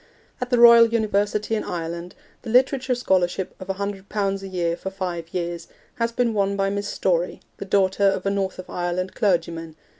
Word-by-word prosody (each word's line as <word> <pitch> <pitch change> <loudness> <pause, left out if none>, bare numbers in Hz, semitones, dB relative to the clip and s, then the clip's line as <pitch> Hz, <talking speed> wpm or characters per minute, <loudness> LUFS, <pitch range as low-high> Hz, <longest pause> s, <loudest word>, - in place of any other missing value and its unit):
At 250 - -2
the 245 - +2
Royal 235 -1 +9
University 210 -1 0
in 215 - 0
Ireland, 170 +1 -5 0.3
the 235 - -8
Literature 255 +1 +3
Scholarship 185 -5 0
of 185 - -9
100 195 0 -4
pounds 195 -2 -1
a 195 - -7
year 175 -3 -1
for 190 - -5
five 175 -4 -5
years 170 -2 -4 0.3
has 230 0 0
been 235 -1 0
won 200 -1 0
by 195 0 +1
Miss 200 0 -2
Story, 175 -3 0 0.2
the - - -6
daughter 195 0 +2
of 195 -1 +2
a 195 - +1
North 195 -1 -2
of 185 - -8
Ireland 180 +1 -3
clergyman. 165 -4 -1
195 Hz, 185 wpm, -23 LUFS, 180-210 Hz, 0.3 s, Royal